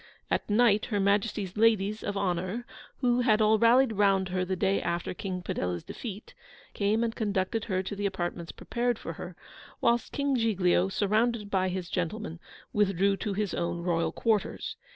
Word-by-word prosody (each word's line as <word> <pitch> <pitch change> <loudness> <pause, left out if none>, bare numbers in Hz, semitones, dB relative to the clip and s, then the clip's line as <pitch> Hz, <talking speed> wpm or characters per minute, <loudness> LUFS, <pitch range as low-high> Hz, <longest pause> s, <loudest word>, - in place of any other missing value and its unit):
At - - 0
night, 215 -1 +4
Her 205 - -1
Majesty's 200 -1 0
ladies 215 -1 +2
of 205 -1 -3
honour 185 +4 -1 0.4
(who 245 -1 +3
had 220 -3 +3
all 215 0 +4
rallied 240 +2 +5
round 195 -2 +2
her 185 0 0
the 190 +1 -2
day 195 +2 +1
after 170 0 -2
King 180 -1 -5
Padella's 90 - -2
defeat) 215 -3 -8 0.4
came 215 +3 +1
and 230 -1 -1
conducted 205 0 -1
her 190 -3 -1
to 205 - -5
the 200 0 0
apartments 175 -3 -4
prepared 240 -1 -2
for - - -6
her; - - -8 0.4
whilst 235 0 +1
King 280 -1 0
Giglio, 195 -6 +2
surrounded 215 +2 0
by 185 -1 +2
his 185 -1 -4
gentlemen, 175 0 -3 0.3
withdrew 195 -1 +2
to 205 +2 -3
his 205 -1 -2
own 170 0 -2
Royal 170 -2 +1
quarters. 220 -3 -1
200 Hz, 170 wpm, -28 LUFS, 185-220 Hz, 0.4 s, rallied